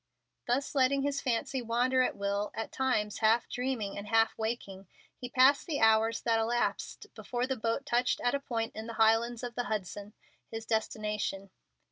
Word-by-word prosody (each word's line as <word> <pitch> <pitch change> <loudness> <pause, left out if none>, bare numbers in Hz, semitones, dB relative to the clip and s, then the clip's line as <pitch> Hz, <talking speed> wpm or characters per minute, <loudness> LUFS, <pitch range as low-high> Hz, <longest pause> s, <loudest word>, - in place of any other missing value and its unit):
Thus 255 +3 0
letting 275 0 +3
his 280 0 -1
fancy 255 +1 -1
wander 245 +3 +2
at 255 - +1
will, 200 +1 -1
at 225 - -4
times 220 -6 0
half 225 +2 +3
dreaming 245 -6 -3
and 200 - -8
half 225 +1 +3
waking, 220 -4 -4 0.3
he 245 - -7
passed 260 +5 +4
the 305 -4 -1
hours 225 0 +4
that 230 -1 +2
elapsed 235 +2 -2
before 245 0 -3
the 265 0 -1
boat 230 +4 -2
touched 245 -2 +1
at 245 - +1
a 280 - +1
point 230 -4 -3
in 220 +1 -6
the 230 - -5
Highlands 225 +2 +3
of 245 -1 -4
the 245 +1 -2
Hudson, 205 0 -4 0.4
his 225 0 -6
destination. 210 -3 -2
230 Hz, 175 wpm, -31 LUFS, 220-250 Hz, 0.4 s, passed